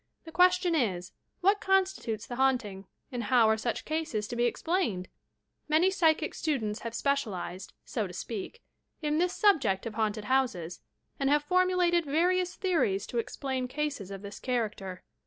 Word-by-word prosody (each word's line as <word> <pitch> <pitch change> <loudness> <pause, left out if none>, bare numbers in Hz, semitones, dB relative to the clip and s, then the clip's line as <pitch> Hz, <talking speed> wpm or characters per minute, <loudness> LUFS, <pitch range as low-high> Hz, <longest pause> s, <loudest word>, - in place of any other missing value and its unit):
The 325 - -9
question 360 0 +4
is: 190 - 0 0.3
what 400 +3 +3
constitutes 375 - +1
the 245 - -6
haunting 235 -8 0 0.2
and 245 -3 -3
how 235 0 +5
are 220 - +4
such 225 +1 -3
cases 310 -10 -2
to - - -4
be 240 0 +2
explained 240 - 0
J - - -26 0.6
Many 320 +5 +4
psychic 325 -5 +2
students 230 -9 -1
have 230 0 -6
special 280 -8 0
ized, 185 +2 -6 0.2
BO 220 -5 0
to 180 - -10
spealt, 210 - -5 0.5
in 300 +1 +1
this 360 +1 +1
subject 290 - +3
of 230 - -4
haunted 215 -1 -1
houses, 210 -11 0 0.4
and 275 -1 +1
have 295 +1 +3
formulated 360 0 +2
various 355 +5 +1
theories 275 - +1
to 240 - -2
explain 260 +1 -3
eases 285 -10 -2
of 195 0 -7
this 200 0 -8
character. 210 -7 -3
260 Hz, 165 wpm, -29 LUFS, 210-335 Hz, 0.6 s, how